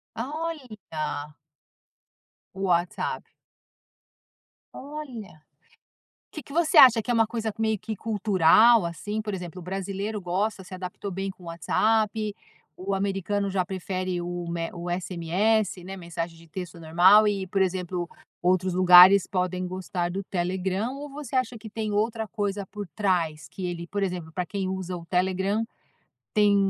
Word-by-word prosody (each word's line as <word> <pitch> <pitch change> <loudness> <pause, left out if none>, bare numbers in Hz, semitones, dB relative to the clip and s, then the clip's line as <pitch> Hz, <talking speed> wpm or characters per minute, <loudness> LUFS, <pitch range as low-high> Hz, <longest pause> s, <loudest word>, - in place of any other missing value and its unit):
Olha! 225 - -5 1.2
O 195 - -7
WhatsApp. 175 -2 0 1.5
Olha. 255 - -8 0.9
Que 310 - -7
que 280 - -15
você 330 0 +1
acha 235 -3 +9
que - - -9
é - - +2
uma 225 -1 +3
coisa 225 -2 -3
meio 220 -1 +1
que 220 +2 -5
cultural, 215 +1 +5
assim? 205 +6 -4
Por 210 -2 -4
exemplo, 180 -1 -6
o - - -9
brasileiro 195 +3 -3
gosta, 190 +3 -1
se 185 - -12
adaptou 185 +2 -6
bem 195 +2 -3
com 185 - -19
o - - -11
WhatsApp, 215 +5 +1 0.4
o 195 +2 -3
americano 200 +1 -1
já 190 -1 +1
prefere 185 -1 -3
o 175 0 -4
o - - -6
me 165 -1 -3
o 175 0 -6
SMS, 185 +3 0
né, 195 +1 -6
mensagem 170 -1 -5
de 165 0 -17
texto 175 0 -7
normal. 180 +6 +6
E, 195 -2 0
por 195 +1 0
exemplo, 180 -1 -1 0.3
outros 185 0 +2
lugares 185 +1 +8
podem 185 -1 -1
gostar 180 -1 -3
do 195 +2 -3
Telegram, 190 +6 -2
ou 290 +1 -7
você 275 -2 -7
acha 250 -2 0
que 220 - -9
tem 215 -1 -3
outra 220 +1 0
coisa 200 -1 -3
por 205 0 -7
trás, 165 -7 0
que 185 - -6
ele, 170 -1 -4
por 200 +2 -3
exemplo, 175 -4 -3
para 180 +2 -2
quem 195 -2 -3
usa 185 -1 -3
o 170 - -10
Telegram, 190 +4 0 0.7
tem 205 -1 +4
190 Hz, 155 wpm, -26 LUFS, 180-215 Hz, 1.5 s, acha